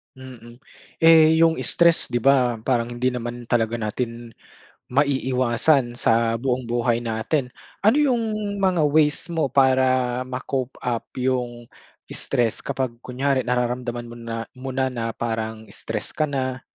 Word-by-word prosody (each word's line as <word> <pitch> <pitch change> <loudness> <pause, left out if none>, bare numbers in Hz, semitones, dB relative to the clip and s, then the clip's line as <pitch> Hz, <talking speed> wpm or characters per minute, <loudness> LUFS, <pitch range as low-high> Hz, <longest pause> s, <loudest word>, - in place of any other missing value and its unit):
Mm, 125 -2 -13 0.4
eh, 160 -1 +7
yung 165 0 +4
stress 170 -1 +3
di 120 - -2
ba, 130 -1 +4
parang 120 0 +1
hindi 125 +2 0
naman 120 -1 -6
talaga 115 -1 +1
natin 115 +2 -4 0.6
maiiwasan 130 -1 +1
sa 115 -1 +2
buong 125 0 -2
buhay 120 0 +1
natin. 120 +4 -1 0.3
Ano 215 +6 +4
yung 275 -5 +3 0.4
mga 185 -5 +2
ways 150 +1 +2
mo 160 -4 0
para 130 -2 +2
ma-cope 130 0 -4
up 120 -2 -2
yung 125 -2 -2 0.5
stress 120 -3 0
kapag 130 -3 -3
kunyari 130 +2 0
nararamdaman 125 -1 -2
mo 120 - -10
na 115 -1 -6 0.2
mo 130 +1 -8
na 125 -3 -2
parang 110 -1 -3
stress 110 -2 -5
ka 155 -1 0
na, 130 -2 -2
125 Hz, 135 wpm, -23 LUFS, 120-135 Hz, 0.6 s, eh